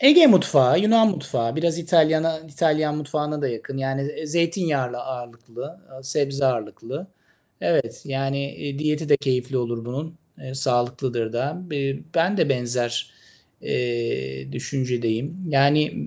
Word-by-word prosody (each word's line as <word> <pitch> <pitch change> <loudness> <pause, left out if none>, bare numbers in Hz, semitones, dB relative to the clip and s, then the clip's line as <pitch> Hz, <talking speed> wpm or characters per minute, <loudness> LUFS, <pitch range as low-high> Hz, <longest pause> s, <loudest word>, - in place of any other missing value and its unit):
Ege 300 +5 +10
mutfağı, 165 - +6
Yunan 220 +2 +5
mutfağı, 125 - -2
biraz 165 +1 +1
İtalyan'a 160 -1 +3
İtalyan 155 -1 0
mutfağına 150 0 -3
da 140 - +1
yakın. 120 +3 -6
Yani, 135 0 -2
eee, 150 +2 -5
zeytinyağlı 160 -6 0
ağırlıklı, 120 -1 -8 0.3
aaa, 130 0 -12
sebze 140 0 0
ağırlıklı. 120 - -3 0.5
Evet. - - 0
Yani, 135 +1 -2
eee, 140 -1 -6
diyeti 150 +1 -1
de 145 - +6
keyifli 130 -1 -1
olur 120 -2 -2
bunun. 145 +7 -5 0.2
Eee, 130 -1 -8
sağlıklıdır 120 -3 0
da. 145 +9 -2
B 150 - -3
eee, 135 -1 -2
ben 175 +5 +2
de 165 - +2
benzer, 120 -2 0 0.5
eee, 70 - -3
düşüncedeyim. 125 - -2
Yani 145 +2 +4
140 Hz, 135 wpm, -23 LUFS, 125-155 Hz, 0.5 s, Ege